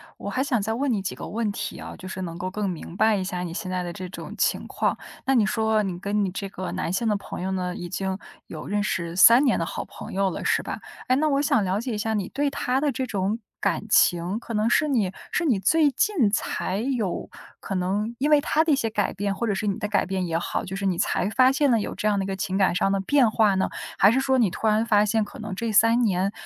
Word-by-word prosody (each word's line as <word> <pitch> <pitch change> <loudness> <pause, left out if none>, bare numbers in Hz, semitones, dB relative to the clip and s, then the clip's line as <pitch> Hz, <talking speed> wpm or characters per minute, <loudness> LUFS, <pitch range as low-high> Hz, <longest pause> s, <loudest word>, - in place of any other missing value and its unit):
我 - - -6
还 255 - -1
想 260 -5 +1
再 220 +2 -1
问 265 +3 0
你 205 - -1
几 190 - -3
个 - - -7
问 220 -1 -1
题 - - -5
啊， - - -8
就 185 - -9
是 190 0 -6
能 170 -2 -5
够 185 +2 -3
更 205 0 -2
明 175 0 -7
白 215 0 +3
一 190 - -2
下 180 -1 -3
你 175 -2 -4
现 185 0 -4
在 185 -1 -2
的 175 - -4
这 185 0 -7
种 180 - -8
情 - - +1
况。 - - -1 0.3
那 270 0 +2
你 220 -4 +4
说 220 +1 +1
你 180 -3 -4
跟 205 +2 0
你 190 - -1
这 195 +1 -4
个 185 -1 -6
男 - - -2
性 210 +5 0
的 210 - +1
朋 200 - -7
友 190 +1 -2
呢， 180 -1 -2
已 175 - -6
经 190 0 -2 0.3
有 155 -2 -8
认 205 0 -1
识 170 -4 -2
3 230 +8 +7
年 260 -5 +2
的 165 - 0
好 - - -4
朋 - - -10
友 195 0 +1
了， - - -5
是 - - +2
吧？ - - -5 0.3
诶， 255 - +4
那 310 - +2
我 280 -1 +2
想 235 -7 +2
了 190 +4 0
解 245 -1 -3
一 - - -2
下 220 +1 -1
你 200 -3 -2
对 285 +1 0
他 265 -2 -1
的 285 -1 0
这 260 - -2
种 205 0 -1 0.2
感 - - 0
情， 175 +1 +3
可 235 - -8
能 215 +1 +1
是 305 - +3
你 225 -10 +1 0.2
是 350 - +1
你 250 -11 +2
最 295 - +3
近 295 - +2
才 195 -2 -1
有 230 -6 -2 0.3
可 - - -6
能 200 +5 -1
因 290 +3 +1
为 300 -1 +6
他 310 +2 +2
的 330 - +1
一 - - +5
些 230 -4 -1
改 210 -2 0
变， 200 0 -2
或 235 - -2
者 205 - 0
是 200 - -3
你 195 - 0
的 210 - -2
改 205 -1 +1
变 190 -1 -2
也 165 -1 0
好， 175 - -2
就 190 - -6
是 195 0 -3
你 185 -3 +1
才 180 - 0
发 255 +4 +4
现 285 +1 +2
了 230 -3 +3
有 - - -4
这 215 - -1
样 205 -1 +2
的 - - 0
一 - - -4
个 195 - -2
情 190 0 -3
感 190 -3 +2
上 195 - +2
的 195 0 +1
变 255 +3 +3
化 210 -3 +3
呢？ 190 - +1 0.3
还 200 - +6
是 255 - +2
说 265 0 +2
你 230 -6 +3
突 220 - -2
然 215 +1 +3
发 210 -2 +4
现 220 0 +1
可 255 - -12
能 215 -3 -5
这 230 +3 -2
3 230 +3 +4
年 195 -2 +1
205 Hz, 300 characters per minute, -25 LUFS, 190-235 Hz, 0.3 s, 3